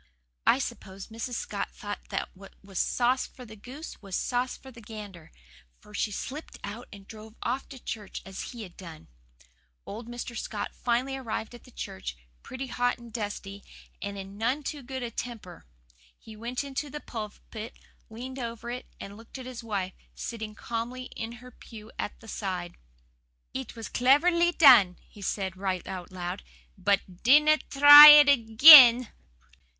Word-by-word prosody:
I - - +5
suppose 190 +2 -7
Mrs. 230 +2 -6
Scott 205 -2 -4
thought 205 0 -7
that 195 - -3
what 195 +1 -15
was 195 -2 -6
sauce 250 +1 0
for 250 - -14
the 220 -1 -12
goose 260 +9 -10
was 195 -3 -6
sauce 250 +1 -2
for 265 - -14
the 235 -2 -14
gander, 205 -6 -11 0.5
for 210 - -18
she 210 - -1
slipped 280 +9 -7
out 215 +5 -7
and 200 -1 -13
drove 220 0 -12
off 255 +3 -3
to 270 - -10
church 215 -4 -7
as 195 0 -7
he 235 -3 -8
had 180 -4 -12
done. 165 -4 -12 0.8
Old 225 +3 -8
Mr. 240 0 -7
Scott 210 -2 -5
finally 250 +3 -1
arrived 240 -3 -5
at 240 - -14
the - - -16
church, 95 - -7 0.2
pretty 260 +1 -7
hot 245 -1 -1
and 235 -2 -14
dusty, 205 -2 -6 0.4
and 200 0 -5
in 195 +1 -9
none 255 +7 -1
too 290 +1 -5
good 260 0 -6
a 235 - -5
temper. 225 - -8 0.5
He 220 - -13
went 235 +5 -4
into 280 +1 -5
the 295 - -7
pulpit, 220 -1 -8 0.3
leaned 255 +4 -8
over 235 -1 -6
it 250 +1 -7
and 200 - -9
looked 225 +4 -12
at 260 - -9
his 250 -2 -8
wife, 195 -4 -3 0.2
sitting 220 -2 -6
calmly 240 +3 -6
in 225 +1 -6
her 250 +1 -13
pew 220 -2 -13
at - - -5
the 225 - -14
side. 185 -5 -5 0.8
"'It 260 -3 -6
was 225 -2 -7
cleverly 335 +7 +3
done,' 245 - +6
he 205 - -16
said, 190 -1 -3
right 190 -1 -3
out 185 -2 -7
loud, 180 +1 -5 0.3
'BUT 195 -2 -1
DINNA 300 +4 +5
TRY 290 +1 +11
IT 295 -1 +10
AGAIN! 245 0 +9
230 Hz, 170 wpm, -27 LUFS, 200-255 Hz, 0.8 s, TRY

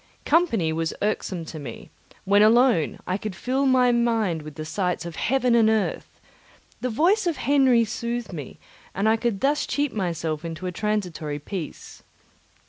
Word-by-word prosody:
Company 235 - +2
was 165 +1 -2
irksome 190 -4 -2
to 155 0 -8
me; 125 -6 -9 0.3
when 200 +1 +4
alone, 225 - +4
I 185 +2 -2
could 215 -3 -5
fill 265 +2 0
my 255 -1 +4
mind 225 -8 +1
with 150 -1 -10
the 155 - -6
sights 180 0 -2
of 170 -2 -7
heaven 255 -1 +1
and 225 -2 +5
earth; 220 -2 -1 0.6
the 255 - -2
voice 355 - +2
of 335 - 0
Henry 260 -3 +3
soothed 235 0 -4
me, 145 -5 -7 0.4
and 200 +3 +1
I 220 - +5
could 225 -3 -2
thus 290 +2 +1
cheat 290 -2 -1
myself 165 -5 -2
into 165 +2 -6
a 180 - -2
transitory 180 -7 -2
peace. 160 +2 -7
215 Hz, 165 wpm, -24 LUFS, 170-245 Hz, 0.6 s, and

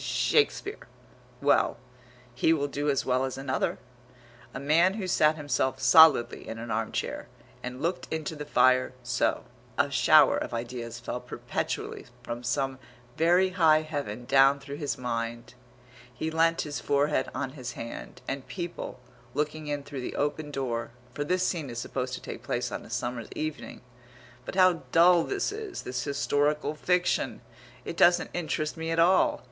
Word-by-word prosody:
Shakespeare.... 435 -1 +1 0.6
Well, - - +3 0.6
he 160 +6 +3
will 145 -3 0
do 145 +1 -2
as 140 - +1
well 130 0 +1
as 130 -1 -3
another. 135 0 -1 0.7
A - - -6
man 165 +7 +3
who 210 -4 -3
sat 155 -4 +3
himself 130 -3 -1
solidly 135 0 +6
in 115 - -6
an 115 0 -6
arm 110 +1 -1
chair, - - -3 0.3
and 125 +3 -6
looked 175 +2 -2
into 160 0 -3
the 150 - -6
fire, 130 -3 +3
so 120 0 0 0.3
A - - +2
shower - - +6
of - - -4
ideas 120 0 -5
fell 120 +1 -4
perpetually 125 - -4 0.2
from 120 0 -5
some 135 +1 -1 0.4
very 175 +3 +4
high 160 -4 +4
Heaven 140 -7 -5
down 135 +2 +5
through 140 +1 -8
his 145 -2 -2
mind. 115 -1 -4 0.6
He 155 +6 -4
leant 165 +1 +2
his 145 -1 -4
forehead 145 -1 +1
on 130 -1 -3
his 125 -4 -7
hand, 115 - -8
and 135 -1 -4
people, 175 -7 -6 0.4
looking 150 +1 -2
in 145 -1 -2
through 140 -2 -6
the - - -5
open 150 +1 -2
door, 120 -5 -3 0.2
for 145 - -2
this 180 +4 +1
scene 160 -8 -2
is 120 - -7
supposed 130 +1 -3
to - - -9
take - - -7
place - - -2
on - - -5
a - - -13
summer's 120 -2 -3
evening 155 0 -5 0.6
But - - -6
how 185 -3 +4
dull 170 +1 +6
this 400 0 -1
is, 420 -2 -6
this 125 -1 -3
historical 145 +1 0
fiction! 180 +3 0 0.4
It - - -5
doesn't 175 0 +4
interest 155 -3 -2
me 160 0 -4
at 165 - -1
all. 175 +3 +4
145 Hz, 165 wpm, -28 LUFS, 125-160 Hz, 0.7 s, solidly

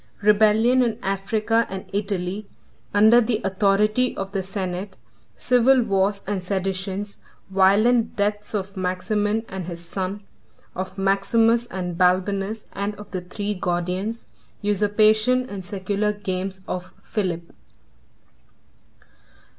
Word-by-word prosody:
—Rebellion 215 +4 +5
In 230 -3 +1
Africa 215 +4 0
And 190 0 -6
Italy, 200 0 -2 0.4
Under 220 +4 +6
The 225 -2 0
Authority 210 +5 +2
Of 195 0 -4
The 195 -1 -1
Senate.—Civil 200 +7 0
Wars 200 -1 +1
And 200 -1 -2
Seditions.—Violent 195 +3 0
Deaths 210 0 -1
Of 200 0 -3
Maximin 205 +4 -1
And 190 -2 -6
His 170 -1 -7
Son, 190 +3 -4 0.5
Of 185 +1 -5
Maximus 225 +5 +2
And 180 -5 -5
Balbinus, 195 +4 +1
And 200 +1 -3
Of 205 0 -12
The 185 - -3
Three 200 +4 -3
Gordians.— 185 +4 -2 0.4
Usurpation 215 +4 +3
And 200 -4 -6
Secular 200 +3 -1
Games 190 -2 -4
Of 185 +1 -5
Philip. 175 -6 -3
200 Hz, 105 wpm, -23 LUFS, 190-215 Hz, 0.5 s, Under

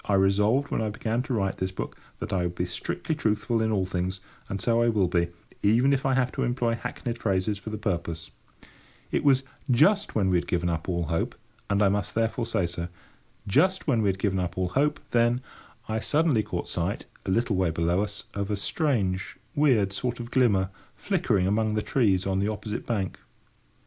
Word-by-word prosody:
I 100 - +2
resolved, 105 +8 +3
when - - 0
I 110 - 0
began 110 +3 -1
to 130 0 -3
write 95 -3 0
this 95 0 -2
book, 95 - -5 0.2
that - - -5
I 95 - +2
would 90 0 -2
be 90 - -1
strictly 160 - -3
truthful 115 -4 0
in 110 0 +1
all 100 -3 +1
things; 95 +1 -2 0.3
and 100 - -3
so 115 +3 +2
I 120 - +4
will 105 -5 +2
be, 85 -1 +1 0.3
even 120 +7 +4
if 135 0 +1
I 135 - +2
have 125 -1 +2
to - - -3
employ 120 -1 +1
hackneyed 120 0 -4
phrases 100 0 0
for 110 - -7
the 110 - -4
purpose. 85 -5 -3 0.8
It - - +1
was 135 -2 +4 0.3
just 190 - +4
when 95 -4 +2
we 90 - +4
had 85 - -2
given 90 0 0
up 85 +1 -2
all 85 -1 0
hope, 80 +1 -1 0.3
and 100 +1 +3
I 100 - +5
must 100 -1 -1
therefore 115 +1 0
say 95 -6 +1
so. 85 0 -3 0.6
Just 185 - +3
when 120 -7 +2
we 105 - +3
had 95 - 0
given 95 -1 0
up 90 0 -3
all 90 -1 0
hope, 150 +8 +1
then, 120 +1 +3 0.5
I 110 0 -1
suddenly 150 -1 +2
caught - - -4
sight, - - -2 0.2
a - - 0
little 115 +2 +2
way 95 -2 +2
below 85 +3 +1
us, 105 -1 -4
of 100 0 -2
a 105 - +1
strange, 100 - -1 0.2
weird 120 -10 +3
sort 120 +4 -2
of 120 0 -6
glimmer 100 -7 +3 0.2
flickering 95 -3 +1
among 105 +2 +1
the 105 - 0
trees 100 -8 +2
on 95 0 +1
the 100 - +1
opposite 105 0 -4
bank. 100 -6 -2
105 Hz, 210 wpm, -27 LUFS, 95-120 Hz, 0.8 s, I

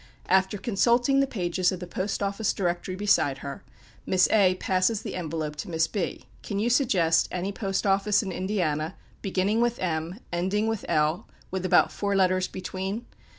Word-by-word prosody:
After 190 +2 +3
consulting 240 +6 +2
the 275 - +3
pages 180 -5 0
of 185 - -4
the 180 - -6
Post 185 +4 -3
office 200 +2 0
Directory 180 0 -2
beside 185 -9 +2
her, 140 - -6 0.4
Miss 185 -1 +3
A 190 -4 +4
passes 185 +3 +1
the - - -5
envelope 160 -3 -3
to 150 - -5
Miss 160 -1 +2
B. 190 +2 -4 0.2
"Can 200 - -4
you 225 +4 +1
suggest 190 - +3
any 185 +2 -3
post 195 -1 -2
office 200 +2 +3
in 190 - -4
Indiana 170 -5 -1 0.3
beginning 195 +3 +1
with 240 0 +1
M, 170 +2 -3
ending 190 +5 0
with 225 -2 -2
L, 155 +3 +1 0.2
with 185 0 -2
about - - +4
four 200 -1 -1
letters 185 -1 +2
between?" 190 +4 -5
190 Hz, 170 wpm, -26 LUFS, 175-205 Hz, 0.4 s, A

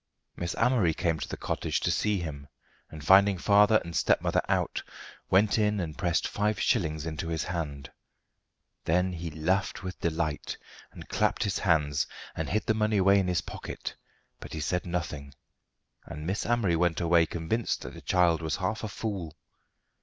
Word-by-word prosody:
Miss 85 0 -3
Amory 110 -11 +3
came 80 -2 0
to - - -4
the - - -5
cottage - - -1
to - - +1
see 105 -1 +1
him, 70 -4 -6 0.4
and 75 -2 -10
finding 100 +1 +6
father 105 +3 +5
and 85 -1 -7
stepmother - - +2
out, - - 0 0.5
went 100 +2 +4
in 105 -1 +2
and 80 -4 -4
pressed 85 -2 0
five 105 -1 -1
shillings 80 -3 0
into 80 0 -4
his 80 -1 -1
hand. 75 -6 -4 0.9
Then 90 +3 +2
he 85 -1 -5
laughed 90 +6 -1
with 90 -1 -6
delight, 80 -2 -2 0.3
and - - -11
clapped - - +1
his 100 - -1
hands, 75 -6 +2 0.3
and 80 - -3
hid 110 - 0
the 110 - +2
money 110 -1 +1
away 100 +1 +5
in 95 - 0
his 90 -1 +1
pocket, - - -7 0.4
but - - -9
he 80 - -4
said 90 +4 -1
nothing, 75 -5 -4 0.7
and 75 +1 -7
Miss 95 +5 -2
Amory 115 -8 +2
went 85 -1 +1
away 85 -1 +4
convinced 85 +9 -2
that - - -7
the - - -10
child 90 -2 +3
was 80 -2 -1
half 100 +5 -2
a - - -1
fool. 100 -7 -5
85 Hz, 175 wpm, -28 LUFS, 80-100 Hz, 0.9 s, finding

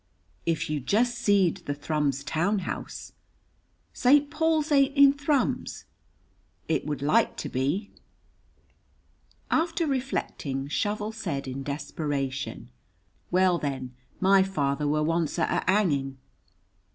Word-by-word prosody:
"If 165 -1 0
you 150 -1 -1
jest 225 - +1
seed 200 -7 +2
the 145 - -1
Thrums 145 -2 -1
town 170 +10 0
house!" - - -6 0.8
"St. 285 +3 +4
Paul's 315 0 +1
ain't 275 0 +3
in 280 0 +8
Thrums." 285 -1 -1 0.8
"It 160 -2 0
would 145 -2 -3
like 150 +2 +2
to - - -4
be." 145 +11 -1 1.6
After 330 +1 +1
reflecting, 250 - -2
Shovel 210 +6 -1
said 140 -11 -4
in 130 +1 -5
desperation, 135 -4 -4 0.6
"Well, 180 -1 +3
then, 130 -3 -4 0.3
my 195 0 +5
father 150 -6 0
were 150 +1 +1
once 165 0 0
at 165 - +1
a - - +1
hanging." 140 -10 +1
165 Hz, 115 wpm, -27 LUFS, -, 1.6 s, in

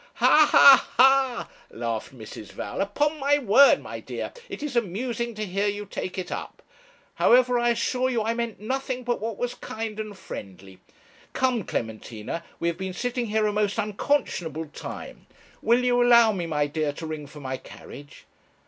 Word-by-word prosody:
'Ha, 305 -1 +5
ha, 275 -1 +8
ha!' 265 -1 +4 0.2
laughed 115 0 -4
Mrs. 110 -4 -11
Val. - - -4
'Upon 295 +10 0
my 285 +1 +3
word, 275 +1 +5
my - - -7
dear, - - -6 0.2
it - - -7
is 290 -4 -4
amusing 235 +2 -2
to 215 0 -3
hear 195 +2 -1
you 205 0 -3
take 185 -1 -6
it 185 - -5
up. - - -7 0.5
However, 250 0 +4
I 240 0 +2
assure 250 +2 0
you 235 -4 0
I 225 +1 0
meant 235 -2 -4
nothing 255 +3 -3
but 240 -3 -2
what 225 -2 -4
was 245 0 -2
kind 220 -1 -6
and 215 -2 -6
friendly. 95 - -10 0.5
Come, 255 -4 +1
Clementina, 110 +6 -5 0.2
we 170 - -1
have 170 +1 -2
been 190 -1 -4
sitting 245 +3 -2
here 215 0 +1
a 210 - 0
most 210 0 0
unconscionable 195 - -1
time. - - -9 0.3
Will 240 +2 +3
you 245 0 +3
allow 235 -2 +6
me, 180 -5 -3
my 150 -2 0
dear, 150 0 -2
to 160 - -7
ring 155 -2 -6
for 150 +1 -12
my 130 -2 -4
carriage?' 145 +2 -13
215 Hz, 175 wpm, -25 LUFS, 165-245 Hz, 0.5 s, ha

